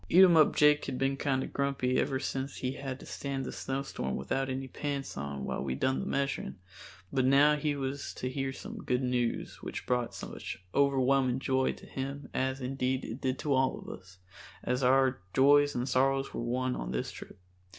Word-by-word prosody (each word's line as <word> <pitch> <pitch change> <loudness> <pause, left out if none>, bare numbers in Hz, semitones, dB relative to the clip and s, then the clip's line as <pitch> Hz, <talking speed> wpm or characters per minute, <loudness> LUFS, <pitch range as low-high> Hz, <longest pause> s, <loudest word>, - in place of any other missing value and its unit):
Eatumup 170 -4 +7
Jake 150 0 +5
had 130 -2 -3
been 135 +1 +1
kinder 135 -1 0
grumpy 135 -2 0
ever 135 -1 0
since 135 0 -3
he 130 - -2
had 135 -1 -5
to - - -10
stand 135 -1 -4
the - - -4
snowstorm 135 - -3
without 135 - -1
any 130 0 -3
pants 140 0 -4
on 70 -1 -4
while - - -2
we 65 -2 -2
done 130 - +1
the - - -4
measuring, 140 0 -1 0.6
but 130 - +2
now 140 +3 +6
he 150 -1 -1
was 140 0 -3
to 125 - -3
hear 135 +1 -2
some - - -8
good 125 +1 0
news 125 -2 -1
which - - -6
brought 125 -1 0
such - - -6 0.2
overwhelming 135 -2 +3
joy 130 0 +1
to - - -14
him 135 +1 -5
as, 130 +1 -1
indeed, 130 0 -1
it 115 +5 -6
did 130 0 0
to 145 0 0
all 130 0 +2
of - - -10
us, 90 0 -11 0.5
as 125 +1 0
our 130 -1 +4 0.2
joys 145 +2 +5
and 125 +1 -1
sorrows 135 +1 +2
were - - -3
one 125 +2 -1
on - - -4
this 60 0 -2
trip. - - -11
135 Hz, 190 wpm, -31 LUFS, 125-140 Hz, 0.6 s, Eatumup